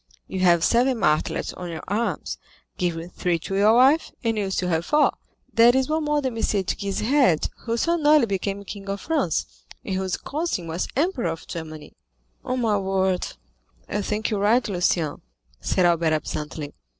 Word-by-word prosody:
You 190 - -4
have 175 -2 +4
seven 250 +2 +3
martlets 150 -7 0
on 180 -1 -7
your 165 -2 -6
arms; 215 +4 -2 0.4
give 170 -1 -3
three 175 -2 0
to 180 +4 -5
your 210 +3 +5
wife, 270 +6 +4
and 225 -1 +1
you 210 -2 -1
will - - -3
still 180 -1 -1
have 165 -1 +1
four; 300 0 +4 0.4
that 235 +2 +6
is 265 +1 +1
one 315 0 0
more 295 -1 +1
than 255 -3 -2
M. 225 - -3
de 200 -2 +1
Guise 195 +1 -3
had, 250 - +3 0.2
who 230 0 0
so 340 +7 +1
nearly 300 -4 +5
became 200 0 -3
King 195 0 -8
of 200 0 -2
France, 325 0 0 0.4
and 195 - -3
whose 190 -1 -1
cousin 300 - -3
was 165 +2 -3
Emperor 290 - 0
of 165 0 -6
Germany." 155 -2 -8 0.5
"On 255 0 -2
my 215 -3 +2
word, 190 -1 0 0.6
I 205 - -2
think 210 +2 -2
you 210 - 0
are - - -2
right, 230 +5 +3
Lucien," 175 -5 0 0.4
said 180 - +1
Albert 170 -2 +3
absently. 150 -1 -4
200 Hz, 185 wpm, -24 LUFS, 175-245 Hz, 0.6 s, that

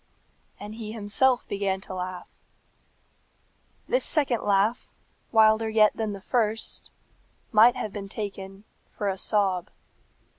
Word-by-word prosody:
And 210 +1 -8
he 220 -1 -7
himself 230 +4 +1
began 195 -1 -1
to 190 - -9
laugh. 185 0 -5 1.6
This - - +1
second 270 -7 +1
laugh, 205 +3 0 0.4
wilder 220 0 +4
yet 215 -1 +4
than 220 -2 -3
the 200 - -8
first, 225 0 -1 0.6
might 230 +2 +6
have 210 - -5
been 200 -1 -6
taken 195 -1 -7 0.3
for 205 - -4
a 190 - -1
sob. 190 -5 +1
210 Hz, 120 wpm, -26 LUFS, 195-225 Hz, 1.6 s, might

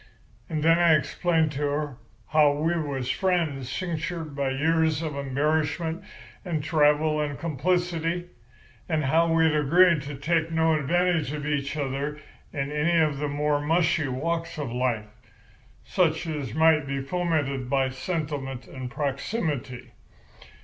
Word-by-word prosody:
"And 155 -2 -2
then 165 +1 +5
I 170 -2 +6
explained 160 +2 +1
to 145 0 -5
her 145 -2 -1 0.3
how 150 -1 +5
we 160 +4 0
was 140 -6 -2
friends 160 -9 0
cinctured 165 -1 -4
by 140 -1 0
years 160 +3 +1
of 155 -3 -3
embarrassment 155 +5 -1 0.4
and 165 -6 -2
travel 150 0 +3
and 145 -1 -3
complicity, 175 +2 -1 0.6
and 155 -2 +1
how 165 +5 +3
we 165 0 +4
had 160 -1 +3
agreed 165 +2 +4
to 140 +1 -6
take 160 +3 0
no 160 0 +2
advantage 165 0 +1
of 150 -1 -4
each 145 0 -2
other 140 +1 -2 0.3
in 140 -1 -3
any 155 +3 +2
of 150 -3 +1
the 150 0 -1
more 145 0 0
mushy 165 0 +2
walks 165 +7 -2
of 145 -6 -4
life, 120 -3 -1 0.8
such 165 -2 +1
as 145 -8 -4
might 160 -2 +4
be 140 0 -2
fomented 140 -4 -1
by 135 -1 +2
sentiment 135 -2 -4
and 130 -2 -7
proximity. 140 - -3
150 Hz, 140 wpm, -26 LUFS, 140-165 Hz, 0.8 s, I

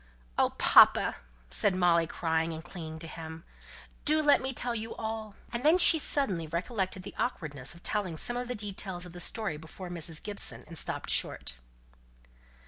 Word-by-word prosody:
"Oh, - - +3
papa!" - - +6 0.3
said 180 - +2
Molly, 170 -2 +3
crying, 160 0 -1
and 160 +1 -8
clinging 160 -3 -8
to 165 +1 -5
him, 160 0 -9 0.6
"do 310 +1 +3
let 295 -2 +4
me 265 +1 -1
tell 245 -1 -2
you 225 0 -5
all." 220 -1 -5 0.2
And 235 - -2
then 315 +4 +5
she 335 -2 +6
suddenly 195 - 0
recollected 185 +3 -3
the - - -9
awkwardness 155 - -2
of 170 - -17
telling 190 -6 -1
some 240 - -1
of 245 0 -3
the 250 - -3
details 190 -3 -4
of 175 - -11
the 175 - -9
story 195 -4 -1
before 175 +4 -9
Mrs. 165 -2 -1
Gibson, 205 -1 +1
and 165 - -11
stopped - - 0
short. - - 0
180 Hz, 175 wpm, -29 LUFS, 165-225 Hz, 0.6 s, papa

